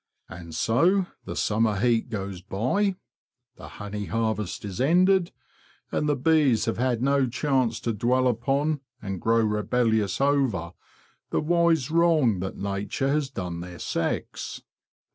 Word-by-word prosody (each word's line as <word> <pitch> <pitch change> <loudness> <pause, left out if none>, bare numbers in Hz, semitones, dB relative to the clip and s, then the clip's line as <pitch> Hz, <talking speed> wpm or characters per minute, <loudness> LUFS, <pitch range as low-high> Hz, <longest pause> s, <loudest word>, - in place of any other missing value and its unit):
And 85 -2 -9
so 175 - +3 0.2
the - - -5
summer 110 -1 +1
heat 120 +1 +1
goes 100 -4 -5
by; 130 - 0 0.6
the - - -10
honey 105 0 -5
harvest 110 -3 -2
is 100 +2 -4
ended; 180 +5 +3 0.6
and 150 - 0
the 145 - +2
bees 140 -4 +3
have 115 - -2
had 125 -1 0
no 140 -1 +3
chance 125 -3 0
to 115 - -1
dwell 125 +4 +2
upon, 135 +5 0 0.2
and 95 -3 -5
grow 115 +1 +3
rebellious 110 -1 +1
over, 135 - +1 0.6
the - - 0
wise 165 -3 +2
wrong 160 - +3
that 95 +1 -5
nature 100 +7 -2
has 145 -1 0
done 90 -8 -5
their 90 0 -8
sex. - - -3
120 Hz, 140 wpm, -26 LUFS, 105-145 Hz, 0.6 s, so